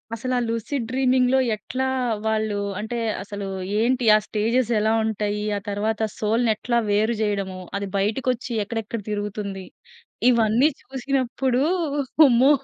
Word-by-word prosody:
అసలు 255 Hz, +3 st, -3 dB
ఆ -, -, +2 dB
'లూసిడ్ 230 Hz, +3 st, -2 dB
డ్రీమింగ్‌'లో 255 Hz, 0 st, +3 dB, 0.2 s
ఎట్లా 255 Hz, +5 st, -3 dB, 0.4 s
వాళ్ళు 220 Hz, -1 st, 0 dB, 0.2 s
అంటే 220 Hz, +3 st, -4 dB, 0.3 s
అసలు 205 Hz, 0 st, -6 dB, 0.3 s
ఏంటి? 245 Hz, +2 st, +1 dB
ఆ -, -, +6 dB
స్టేజ్‌స్ 230 Hz, +3 st, 0 dB
ఎలా 215 Hz, +1 st, +2 dB
ఉంటాయి? 210 Hz, -1 st, -1 dB, 0.2 s
ఆ -, -, -3 dB
తరువాత 210 Hz, +2 st, -1 dB, 0.2 s
సోల్‌ని 225 Hz, +2 st, +1 dB
ఎట్లా 235 Hz, +3 st, -1 dB
వేరు 215 Hz, +3 st, +2 dB
చేయడము? 200 Hz, -3 st, -1 dB, 0.2 s
అది 200 Hz, 0 st, -3 dB
బయటకొచ్చి 245 Hz, +5 st, -1 dB
ఎక్కడెక్కడ 225 Hz, +1 st, -4 dB
తిరుగుతుంది? 205 Hz, -2 st, -4 dB, 0.6 s
ఇవన్నీ 235 Hz, +3 st, +4 dB
చూసినప్పుడు, 260 Hz, -1 st, -1 dB, 0.7 s
అమ్మో! 255 Hz, +3 st, +5 dB
225 Hz, 125 wpm, -23 LUFS, 210-250 Hz, 0.7 s, ఆ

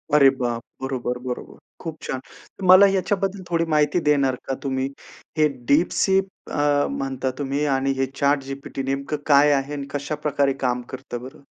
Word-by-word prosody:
अरे 140 Hz, -2 st, +8 dB
बाप! 120 Hz, -2 st, -1 dB, 0.2 s
बरोबर-बरोबर. 125 Hz, -1 st, -4 dB, 0.3 s
खूप 165 Hz, -3 st, -4 dB
छान. 130 Hz, -, -3 dB
तर 190 Hz, -, -15 dB
मला 185 Hz, +2 st, +9 dB
याच्याबद्दल 195 Hz, 0 st, 0 dB
थोडी 165 Hz, -1 st, +1 dB
माहिती 150 Hz, +2 st, +3 dB
देणार 140 Hz, -3 st, +3 dB
का 135 Hz, -, -1 dB
तुम्ही? 130 Hz, -1 st, -1 dB, 0.5 s
हे 155 Hz, -, +5 dB, 0.2 s
DeepSeek 190 Hz, +5 st, +3 dB, 0.2 s
अ, 145 Hz, 0 st, +2 dB
म्हणता 135 Hz, -1 st, -2 dB
तुम्ही 140 Hz, +1 st, -1 dB
आणि 135 Hz, +1 st, +1 dB
हे 135 Hz, -, +2 dB
ChatGPT 140 Hz, -1 st, -1 dB
नेमकं 140 Hz, +2 st, -2 dB
काय 145 Hz, 0 st, +6 dB
आहे? 140 Hz, +1 st, 0 dB
आणि 140 Hz, -1 st, -5 dB
कशाप्रकारे 145 Hz, -1 st, 0 dB
काम 125 Hz, -1 st, +1 dB
करतं 130 Hz, -2 st, -6 dB
बरं? 130 Hz, +2 st, -10 dB
140 Hz, 150 wpm, -23 LUFS, 135-150 Hz, 0.5 s, मला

